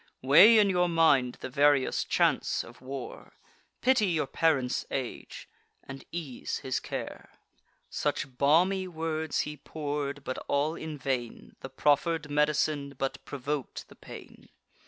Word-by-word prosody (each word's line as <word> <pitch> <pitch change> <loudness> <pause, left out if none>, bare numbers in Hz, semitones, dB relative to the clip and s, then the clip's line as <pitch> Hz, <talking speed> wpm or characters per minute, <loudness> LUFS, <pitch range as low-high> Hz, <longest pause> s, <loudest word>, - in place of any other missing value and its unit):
Weigh 185 - +8
in 210 -1 +5
your 180 -1 +2
mind 145 -7 +3
the 130 - -5
various 145 -1 +3
chance - - +1
of - - -15
war; 130 0 -8 0.5
Pity 250 -5 +3
your 165 -4 0
parent's 135 -6 0
age, 130 -3 -6 0.4
and 135 0 -10
ease 160 -7 -5
his 130 - -2
care." - - -7 0.6
Such 135 -2 -3
balmy 180 +8 +3
words 160 -2 -2
he 150 0 -6
pour'd, 145 -1 -4
but 130 - -4
all 145 +3 +1
in 160 -2 -7
vain: 130 -3 -4
The 130 - -8
proffer'd 150 +3 +1
med'cine 150 -1 0
but 135 0 -3
provok'd 145 -1 -5
the - - -15
pain. - - -13
145 Hz, 135 wpm, -28 LUFS, 135-165 Hz, 0.6 s, Weigh